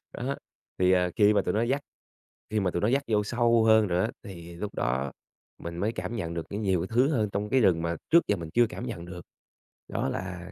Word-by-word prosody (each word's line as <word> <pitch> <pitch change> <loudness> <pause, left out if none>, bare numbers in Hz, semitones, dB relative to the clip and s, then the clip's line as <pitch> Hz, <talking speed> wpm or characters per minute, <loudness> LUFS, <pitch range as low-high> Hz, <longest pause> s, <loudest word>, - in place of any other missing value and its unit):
Đó. 135 +3 -3 0.4
Thì, 90 0 +4
à, 90 -1 +3
khi 105 0 +5
mà 100 - +3
tụi - - -1
nó 110 - +2
dắt 135 +4 +1 0.7
khi 110 -1 +1
mà 95 -2 +1
tụi 85 - -2
nó 105 - +3
dắt 135 +3 +2
vô 105 -2 +2
sâu 120 0 +3
hơn 110 -1 +5
rồi 90 -1 +1
á, - - -1
thì 85 -3 -10
lúc 105 +3 -5
đó 65 +2 -1 0.5
mình 85 0 -6
mới 105 +6 -1
cảm 90 +5 -4
nhận 85 -6 -3
được 85 - -4
có 100 - -4
nhiều 95 -5 0
thứ 120 +6 +3
hơn 110 -8 +1
trong 100 +1 -2
cái 130 - +4
rừng 85 -6 +3
mà 85 0 -1
trước 170 +1 +7
giờ 105 - +2
mình 85 -3 -7
chưa 120 0 +5
cảm 125 - -6
nhận 90 -8 -5
được 90 0 -8 0.7
đó - - -2
là 90 +1 -5
100 Hz, 245 wpm, -28 LUFS, 85-115 Hz, 0.7 s, trước